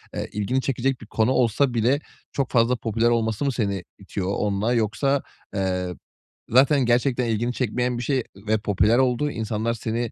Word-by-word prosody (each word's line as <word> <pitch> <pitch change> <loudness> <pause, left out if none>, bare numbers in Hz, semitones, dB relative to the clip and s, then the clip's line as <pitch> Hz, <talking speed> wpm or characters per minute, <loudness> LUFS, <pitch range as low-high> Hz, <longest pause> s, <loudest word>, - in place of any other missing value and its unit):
eee, - - -3
ilgini 115 +6 0
çekecek 135 -1 -1
bir 110 - -11
konu 110 +3 +1
olsa 125 +1 +2
bile 120 +5 +2 0.3
çok 135 -2 -1
fazla 120 +1 +3
popüler 115 +1 +1
olması 115 +2 0
mı 140 - +2
seni 100 -6 -2 0.2
itiyor 95 -1 -4
onda 105 +3 0
yoksa, 125 +5 +1 0.3
eee, 90 -1 0 0.6
zaten 135 +2 +5
gerçekten 125 +1 +2
ilgini 115 +2 0
çekmeyen 125 0 -1
bir 120 - -3
şey 130 -2 0 0.2
ve 110 0 +3
popüler 105 +3 +2
olduğu, 130 +3 +2
insanlar 110 +1 -2
seni 115 0 -3
120 Hz, 165 wpm, -24 LUFS, 110-130 Hz, 0.6 s, zaten